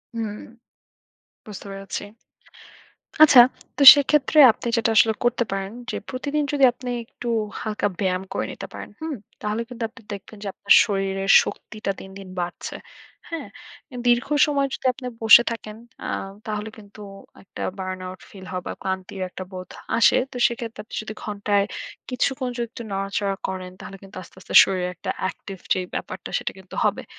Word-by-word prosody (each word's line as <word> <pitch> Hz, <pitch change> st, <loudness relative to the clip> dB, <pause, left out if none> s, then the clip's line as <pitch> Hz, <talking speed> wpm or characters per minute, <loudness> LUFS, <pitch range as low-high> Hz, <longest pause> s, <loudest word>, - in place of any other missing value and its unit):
হুম। 220 Hz, -2 st, -2 dB, 1.2 s
বুঝতে 205 Hz, -2 st, -9 dB
পেরেছি। 195 Hz, +1 st, -6 dB, 1.2 s
আচ্ছা, 265 Hz, -5 st, +9 dB, 0.4 s
তো 280 Hz, -, +3 dB
সেক্ষেত্রে 290 Hz, +1 st, +2 dB
আপনি 235 Hz, -, -8 dB
যেটা 225 Hz, 0 st, +2 dB
আসলে 220 Hz, 0 st, +6 dB
করতে 240 Hz, 0 st, +2 dB
পারেন। 195 Hz, 0 st, -3 dB, 0.2 s
যে -, -, -4 dB
প্রতিদিন 285 Hz, +3 st, -2 dB
যদি 280 Hz, -2 st, +1 dB
আপনি 250 Hz, 0 st, -7 dB, 0.2 s
একটু 240 Hz, -, -9 dB, 0.3 s
হালকা 210 Hz, -1 st, -1 dB
ব্যায়াম 185 Hz, -1 st, 0 dB
করে -, -, -1 dB
নিতে -, -, -8 dB
পারেন, -, -, -8 dB
হুম? 315 Hz, -3 st, -3 dB, 0.3 s
তাহলে 210 Hz, +2 st, -2 dB
কিন্তু 240 Hz, -1 st, -6 dB
আপনি 255 Hz, +1 st, -17 dB
দেখবেন 205 Hz, +2 st, -10 dB
যে -, -, -5 dB
আপনার 200 Hz, -, +3 dB
শরীরের 195 Hz, -1 st, 0 dB
শক্তিটা 215 Hz, -2 st, -5 dB
দিন, 190 Hz, -, -10 dB
দিন 190 Hz, -1 st, -10 dB
বাড়ছে, 175 Hz, 0 st, -5 dB, 0.5 s
হ্যাঁ? 330 Hz, -1 st, -5 dB, 0.4 s
অ্যা 250 Hz, -, -9 dB
দীর্ঘ 240 Hz, 0 st, +3 dB, 0.2 s
সময় 280 Hz, -2 st, +1 dB
যদি -, -, -7 dB
আপনি 250 Hz, 0 st, -8 dB, 0.2 s
বসে 225 Hz, +2 st, +9 dB
থাকেন 215 Hz, -2 st, -6 dB, 0.3 s
আ -, -, -3 dB, 0.4 s
তাহলে 215 Hz, 0 st, -3 dB
কিন্তু 210 Hz, 0 st, -14 dB, 0.4 s
একটা -, -, -8 dB, 0.2 s
burn 185 Hz, 0 st, -4 dB
out 185 Hz, 0 st, -9 dB
ফিল 190 Hz, -2 st, -12 dB
হয় 180 Hz, 0 st, -3 dB
বা -, -, -3 dB
ক্লান্তির 190 Hz, 0 st, -4 dB
একটা 185 Hz, -, -7 dB
বোধ 185 Hz, -1 st, -8 dB, 0.3 s
আসে। 230 Hz, -, +5 dB
তো -, -, -13 dB
সেক্ষেত্রে 235 Hz, -2 st, -6 dB
আপনি -, -, -10 dB
যদি 215 Hz, 0 st, -7 dB
ঘন্টায় 205 Hz, -1 st, 0 dB, 0.4 s
কিছুক্ষণ 255 Hz, 0 st, -1 dB
যদি 240 Hz, -, -1 dB
একটু 235 Hz, -, -8 dB
নাড়াচাড়া 195 Hz, 0 st, -2 dB
করেন, 185 Hz, -1 st, -5 dB
তাহলে 195 Hz, -, -9 dB
কিন্তু 195 Hz, -, -14 dB
আস্তে, -, -, -18 dB
আস্তে -, -, -9 dB
শরীরে 185 Hz, -2 st, -1 dB
একটা -, -, -4 dB
অ্যাকটিভ 190 Hz, +1 st, -5 dB, 0.2 s
যে -, -, -1 dB, 0.2 s
ব্যাপারটা 185 Hz, -1 st, -6 dB
সেটা -, -, -3 dB
কিন্তু 190 Hz, -, -12 dB
হবে। -, -, 0 dB
210 Hz, 170 wpm, -23 LUFS, 195-240 Hz, 1.2 s, আচ্ছা